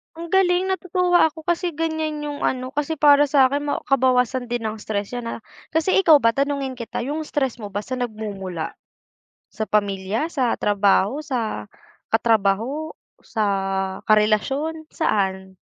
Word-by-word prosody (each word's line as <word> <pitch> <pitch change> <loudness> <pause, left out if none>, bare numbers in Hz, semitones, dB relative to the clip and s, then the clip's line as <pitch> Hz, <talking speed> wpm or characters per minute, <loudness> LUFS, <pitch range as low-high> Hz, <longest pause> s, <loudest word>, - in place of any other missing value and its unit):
Ang 335 0 -8
galing 380 0 +3
natutuwa 360 -2 +2
ako 320 0 -10
kasi 345 -1 -1
ganyan 315 -2 -2
yung 290 -1 -5
ano. 255 0 -1
Kasi 295 +2 -2
para 290 -1 +5
sa'kin 280 +1 +3
ma - - -2
kabawasan 255 -2 +2
din 240 -1 -3
ng 215 0 -3
stress 205 0 -3
yan, 245 -1 -4
ah. 230 - -6 0.3
Kasi 325 +4 +2
ikaw 325 -5 +7
ba 230 - +5
tanungin 275 0 -1
kita 240 -1 -5
yung 295 +4 -3
stress 265 -4 -1
mo 210 - -6
ba 205 +1 -4
san 255 -1 -4
nagmumula? 200 -7 -4 0.8
Sa 220 0 -4
pamilya, 205 - 0
sa 255 -5 +1
trabaho, 205 +5 +2
sa 230 - -3 0.4
katrabaho, 225 +7 +1 0.2
sa 220 -2 -3 0.6
karelasyon? 270 +10 +1
Saan? 190 - 0
255 Hz, 145 wpm, -22 LUFS, 215-310 Hz, 0.8 s, ikaw